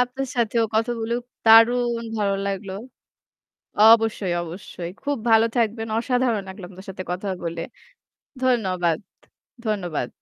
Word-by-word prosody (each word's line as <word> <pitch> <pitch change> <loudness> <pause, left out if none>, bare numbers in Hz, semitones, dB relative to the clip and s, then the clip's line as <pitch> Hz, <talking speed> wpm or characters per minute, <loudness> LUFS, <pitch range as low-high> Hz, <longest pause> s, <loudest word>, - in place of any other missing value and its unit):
আপনার 255 +2 -1
সাথেও 230 -1 +2
কথা 225 +2 +1
বলে 225 +1 -1 0.3
দারুণ 235 +1 +5
ভালো 200 -1 +1
লাগল। 195 0 -3 1.2
অবশ্যই, 225 -5 +3
অবশ্যই। 175 0 -7
খুব 285 -1 -1
ভালো 225 0 +6
থাকবেন। 225 -1 0
অসাধারণ 245 -3 0
লাগলো 190 +1 -9
আপনার 190 0 -13
সাথে 185 -1 -6
কথা 185 +3 -4 0.2
বলে। 170 0 -3 0.8
ধন্যবাদ, 185 -10 +1 0.7
ধন্যবাদ। 175 - -2
220 Hz, 115 wpm, -23 LUFS, 190-235 Hz, 1.2 s, ভালো